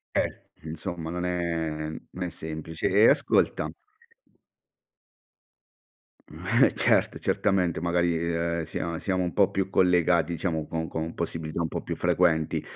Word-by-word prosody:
Eh, -, -, 0 dB, 0.2 s
insomma, 80 Hz, +1 st, -5 dB
non 90 Hz, +1 st, -3 dB
è 85 Hz, -3 st, -2 dB
n 80 Hz, -, -9 dB
non 90 Hz, -, -5 dB
è 90 Hz, -, -2 dB
semplice 80 Hz, 0 st, -4 dB
e 105 Hz, +4 st, +6 dB
ascolta -, -, +2 dB, 2.6 s
Mh, -, -, +1 dB
eh, -, -, +1 dB
certo, -, -, +2 dB
certamente, 95 Hz, -5 st, +1 dB
magari, 85 Hz, 0 st, +1 dB
ehm, 85 Hz, 0 st, -1 dB
sia 85 Hz, +1 st, -4 dB
siamo 95 Hz, -1 st, 0 dB
un 85 Hz, -, -2 dB
po' 100 Hz, -, +4 dB
più 95 Hz, 0 st, -1 dB
collegati, 85 Hz, -3 st, +3 dB
diciamo, 80 Hz, -4 st, -2 dB
con 80 Hz, 0 st, -3 dB
con 80 Hz, 0 st, -4 dB
possibilità 80 Hz, -1 st, -3 dB
un 80 Hz, -, -1 dB
po' -, -, -4 dB
più -, -, -4 dB
frequenti. 80 Hz, -1 st, +2 dB
85 Hz, 140 wpm, -27 LUFS, 80-90 Hz, 2.6 s, e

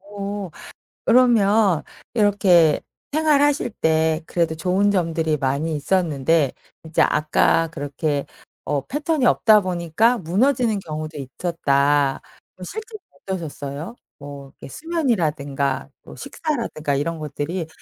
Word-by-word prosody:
어 200 Hz, -1 st, -6 dB, 0.6 s
그러면 220 Hz, -7 st, +4 dB, 0.3 s
이렇게 190 Hz, -8 st, +4 dB, 0.3 s
생활하실 290 Hz, -5 st, +2 dB
때 160 Hz, 0 st, +2 dB
그래도 165 Hz, -2 st, -1 dB
좋은 190 Hz, +4 st, +1 dB
점들이 165 Hz, -4 st, 0 dB
많이 140 Hz, +4 st, -1 dB
있었는데 155 Hz, -3 st, +1 dB, 0.3 s
이제 160 Hz, -, 0 dB
아까 155 Hz, +2 st, +2 dB
그렇게 145 Hz, 0 st, -3 dB, 0.4 s
어 140 Hz, -1 st, -2 dB
패턴이 295 Hz, -1 st, -1 dB
없다 215 Hz, -3 st, +5 dB
보니까 185 Hz, +6 st, +1 dB
무너지는 220 Hz, -, +1 dB
경우도 155 Hz, -2 st, -6 dB
있었다. 140 Hz, -1 st, 0 dB, 0.3 s
그럼 185 Hz, -, -9 dB
실제로는 435 Hz, -, -8 dB, 0.2 s
어떠셨어요? 160 Hz, -, -6 dB, 0.2 s
뭐 140 Hz, -1 st, -9 dB
이렇게 -, -, -9 dB
수면이라든가 150 Hz, -, -1 dB
뭐 -, -, -12 dB
식사라든가 230 Hz, -, -3 dB
이런 165 Hz, +3 st, -2 dB
것들이 155 Hz, +3 st, -4 dB
170 Hz, 285 characters per minute, -22 LUFS, 150-210 Hz, 0.6 s, 없다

